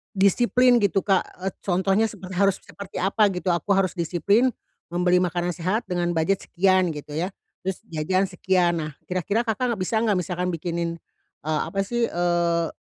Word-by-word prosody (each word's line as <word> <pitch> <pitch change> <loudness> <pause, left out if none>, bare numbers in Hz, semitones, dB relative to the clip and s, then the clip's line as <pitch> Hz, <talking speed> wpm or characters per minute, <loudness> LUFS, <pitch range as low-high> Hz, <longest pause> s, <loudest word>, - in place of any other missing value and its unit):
disiplin 240 +5 +4
gitu, 195 -3 +1
Kak, 195 -2 +3 0.2
eee, 190 - -1
contohnya 195 +4 +1
seper 190 -3 -10
harus 195 +1 +1
seperti 200 -2 -11
apa 200 +3 +3
gitu, 185 -1 -1
aku 185 +4 +1
harus 190 -2 +2
disiplin, 190 - +2 0.4
membeli 180 +1 +3
makanan 175 -1 0
sehat 185 +7 -1
dengan 175 -1 0
budget 185 +4 +1
sekian 185 -1 +2
gitu 150 -1 -8
ya, 175 +5 -1 0.3
terus 190 0 -3
jajan 175 +5 0
sekian. 180 -1 +1
Nah, 155 - -5 0.2
kira-kira 200 +6 -1
Kakak 245 +3 0
enggak 215 - -6
bisa 225 - -2
enggak, 215 -4 +2
misalkan 180 +1 -2
bikinin 170 0 -3 0.5
eee, 155 -1 0
apa 195 - -4
sih 240 +1 0
eee, 170 -1 +1
185 Hz, 170 wpm, -24 LUFS, 175-200 Hz, 0.5 s, disiplin